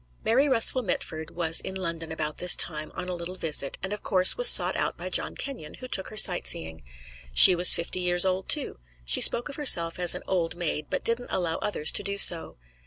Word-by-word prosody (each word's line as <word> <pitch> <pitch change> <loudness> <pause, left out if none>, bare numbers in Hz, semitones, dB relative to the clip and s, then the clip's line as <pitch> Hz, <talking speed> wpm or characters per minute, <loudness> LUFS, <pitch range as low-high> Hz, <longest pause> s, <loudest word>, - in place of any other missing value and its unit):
Mary 265 +6 +1
Russell 255 0 +1
Mitford 160 -6 -6
was 165 -1 +1
in 190 - -8
London 165 -3 -6
about 155 -1 -5
this 180 0 +4
time 155 -2 -3
on 180 -1 -6
a 180 - -5
little 175 +1 -8
visit, 150 -6 -3
and 190 +2 -5
of 210 - -8
course 185 -2 +1
was - - +7
sought - - +4
out - - -4
by - - -8
John - - -2
Kenyon, 260 - -9
who 255 - -11
took 190 -6 -3
her 215 - -11
sightseeing. 80 - +2 0.5
She 180 - +7
was 175 +1 +7
fifty 170 +2 -6
years 180 0 -1
old, 185 0 -4
too; - - -1 0.3
she 60 - 0
spoke 240 - +4
of 285 - -11
herself 170 - +2
as 175 -1 +1
an - - -9
old 175 -3 -3
maid, 155 -3 -5
but - - -5
didn't 235 +1 -3
allow 170 -3 -4
others 160 -7 -2
to - - -2
do 200 0 -6
so. 170 -4 +3
180 Hz, 220 wpm, -24 LUFS, 165-200 Hz, 0.5 s, was